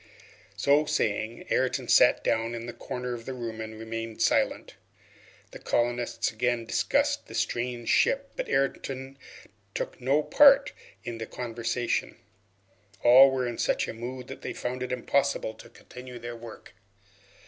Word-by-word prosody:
So 145 +2 +3
saying, 110 -4 -1
Ayrton - - 0
sat - - +5
down 115 +1 0
in 115 0 -6
a 120 - -6
corner 125 +1 -5
of 115 -1 -8
the 130 - -4
room 115 -3 -5
and 110 0 -7
remained 115 0 -6
silent. 115 - +1 0.8
The - - -10
colonists 120 0 0
again 120 +1 -1
discussed - - 0
the - - -9
strange 120 -1 -2
ship, 275 - +2
but - - -4
Ayrton 135 0 -2 0.6
took - - -4
no 140 +4 +2
part 280 - +6 0.3
in 115 -1 -6
the 115 - -5
conversation. 120 0 -2 0.9
All 130 +3 +9
were 130 -1 -1
in 120 -1 -4
such - - +1
a - - -5
mood 125 +2 -7
that - - -9
they - - -5
found 125 +1 -4
it 125 0 -3
impossible 130 -1 0
to 110 - -14
continue 125 +1 -11
their 120 0 -7
work. 115 -1 -11
120 Hz, 150 wpm, -27 LUFS, 115-130 Hz, 0.9 s, All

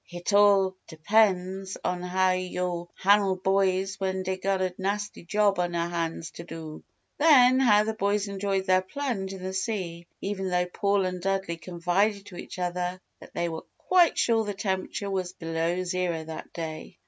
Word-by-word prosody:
"Hit 175 +3 -4
all 200 -2 +5
depen's 190 +2 +1
on 180 -1 -1
how 185 +1 +2
yo' 180 -1 -2
han'le 200 -1 +3
boys 190 0 +1
when 190 -1 -1
dey 190 0 -1
gotta 185 -1 -1
nasty 205 +1 -3
job 200 +2 +2
on 175 -1 -1
'er 170 0 0
han's 165 -1 -3
to 170 - -9
do!" 160 -2 -8 0.4
Then, 260 -5 +6
how 210 -5 +5
the 220 +1 -2
boys 205 -1 0
enjoyed 195 -1 -1
their 185 -1 +4
plunge 195 -2 -3
in 190 -1 -8
the 190 0 -4
sea, 185 -4 -3
even 195 -1 -3
though 180 0 +1
Paul 200 +2 0
and 180 -1 -3
Dudley 195 -2 -1
confided 185 +4 0
to 195 - -11
each - - -8
other 180 0 -2 0.2
that - - -15
they 170 - 0
were 160 -1 -6
quite 360 -3 +3
sure 225 -1 +3
the 205 -1 -4
temperature 195 +1 -3
was 185 -2 -2
below 165 +1 -2
zero 175 -2 -1
that 160 0 -8
day. 160 - -6
190 Hz, 170 wpm, -27 LUFS, 175-200 Hz, 0.4 s, Then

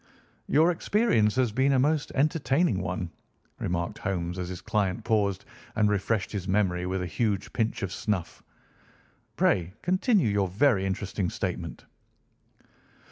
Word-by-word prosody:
"Your 160 +4 +4
experience 170 - +2
has 130 -3 +2
been 130 +5 +2
a - - +4
most 150 +3 +1
entertaining 145 - +2
one," 90 -1 -3 0.5
remarked 85 +4 -2
Holmes 90 -2 -2
as 90 -1 -3
his 90 -1 -5
client 105 -2 -1
paused 105 -4 +1 0.3
and 105 -1 +3
refreshed 105 0 0
his 95 -3 -4
memory 90 -2 +1
with 95 0 -1
a - - -2
huge 105 +1 -1
pinch 110 -2 -1
of 95 -2 -3
snuff. 100 -6 -3 0.9
"Pray 90 0 +2
continue 185 - +2
your 100 -2 +1
very 100 0 +2
interesting 95 -1 -2
statement." - - -4
105 Hz, 135 wpm, -27 LUFS, 95-130 Hz, 0.9 s, Your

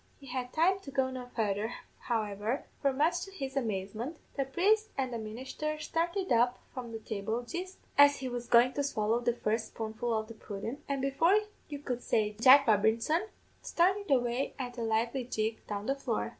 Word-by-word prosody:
He 280 - -14
had 250 -1 -4
time 365 +5 +3
to 340 - -10
go 265 -1 0
no 255 -1 -6
farther, 220 -1 -1 0.2
however; 215 +1 -2 0.2
for 275 - +3
much 320 +6 +1
to 390 - -9
his 275 -8 -5
amazement, 225 - -2 0.2
the 275 - 0
priest 420 +10 +2
and 260 -2 -1
the 230 - -2
ministher 260 +8 -4
started 340 +3 -1
up 245 +1 +4 0.2
from 245 -3 -6
the 225 - -4
table 220 +2 -3
jist 360 +8 -6 0.2
as 285 0 +8
he 265 - -4
was 245 -1 -4
goin' 245 +2 +5
to 285 - -1
swallow 225 -4 +1
the 240 -1 0
first 220 -1 -1
spoonful 225 +1 -4
of 220 -1 0
the 230 - -9
pudden, 220 +4 -6
and 275 -1 -1
before 325 +8 +4 0.3
you 290 - -4
could 250 -4 -4
say 210 -3 +1
Jack 275 +3 +9
Robinson, 225 - +2 0.3
started 385 +4 +1
away 245 0 +1
at 245 -2 -5
a - - -2
lively 230 +3 0
jig 220 -2 -2
down 205 0 -4
the 270 - +2
floor. 245 -5 -2
250 Hz, 190 wpm, -31 LUFS, 225-285 Hz, 0.3 s, Jack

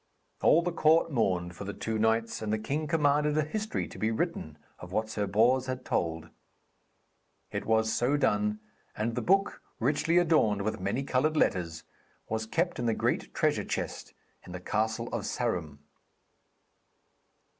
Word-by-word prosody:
All 170 - +5
the 175 - -1
court 160 0 +3
mourned 90 - 0
for 95 - -7
the 100 +1 -5
two 110 -1 -2
knights, 110 +1 +1
and 110 -1 -2
the 110 - +2
king 145 +8 -2
commanded 150 -1 +2
a 155 - +3
history 215 +8 -3
to - - -11
be 110 - +1
written 110 - -3 0.2
of 90 - -10
what 110 +2 -1
Sir 105 -2 -1
Bors 120 +6 +3
had 130 0 -4
told. 80 0 -2 1.2
It - - -4
was 110 0 +2
so 130 +5 +2
done, 105 -5 +1 0.4
and 115 +2 -1
the 125 - -2
book 195 +6 +2 0.2
richly 150 +7 +2
adorned 155 - +3
with 110 - -2
many 100 +8 -1
coloured 140 +4 +1
letters, 85 - 0 0.4
was 110 0 -2
kept 170 +8 -1
in 120 - -1
the 115 - +2
great - - -1
treasure - - +1
chest - - -4 0.3
in 90 - -10
the 90 - -5
castle 110 +5 -1
of 115 -4 -3
Sarum. 85 - -2
115 Hz, 165 wpm, -29 LUFS, 105-150 Hz, 1.2 s, All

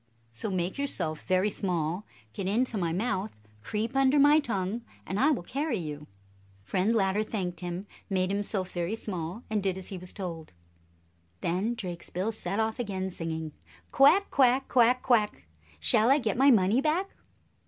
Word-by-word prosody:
So 115 - -1
make 185 +4 -2
yourself 170 - -1
very 185 +3 +2
small, 180 0 -2 0.3
get 195 - -4
into 235 +4 +1
my 175 -5 0
mouth, 190 +2 -1 0.3
creep 215 - -3
under 270 +1 +4
my 290 +2 +6
tongue, 220 -5 -2 0.2
and 195 - -3
I 280 - +5
will 270 - 0
carry 275 - -2
you." 150 -3 -6 0.6
Friend 185 - +1
Ladder 195 -1 +2
thanked 185 -5 -3
him, 175 +2 -5 0.2
made 185 -1 +1
himself 200 -2 -2
very 175 +4 -2
small, 185 0 -4
and 215 -1 -1
did 190 -1 -1
as 190 - -7
he 190 - -6
was 180 0 -7
told. 170 - -7 0.9
Then 195 +8 0
Drakesbill 180 +1 -4
set 200 -2 -3
off 220 +2 -1
again, 190 -5 -3
singing, 160 -2 -4 0.4
"Quack, 355 +9 +5
quack! 260 0 +3
Quack, 250 0 +4
quack! 215 - +1 0.3
Shall 215 - +5
I 275 - +6
get 225 -8 -1
my 270 +3 +5
money 220 +1 +4
back?" 325 +6 +1
200 Hz, 165 wpm, -28 LUFS, 180-240 Hz, 0.9 s, my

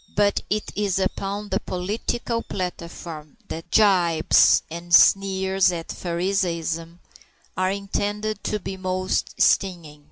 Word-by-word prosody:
But 205 0 +2
it 210 0 -2
is 200 -2 0
upon 195 +2 -2
the - - 0
political 225 +5 -3
platform 170 -5 -6
that 165 +1 -7
the - - +5
gibes 175 -6 +4
and 170 +1 -8
sneers 190 0 +4
at 165 -2 -5
Phariseeism 170 -2 -2 0.6
are 185 0 +1
intended 205 +2 -3
to 210 - 0
be 190 -1 -6
most 185 0 -2
stinging. 170 -6 +1
185 Hz, 120 wpm, -23 LUFS, 170-200 Hz, 0.6 s, the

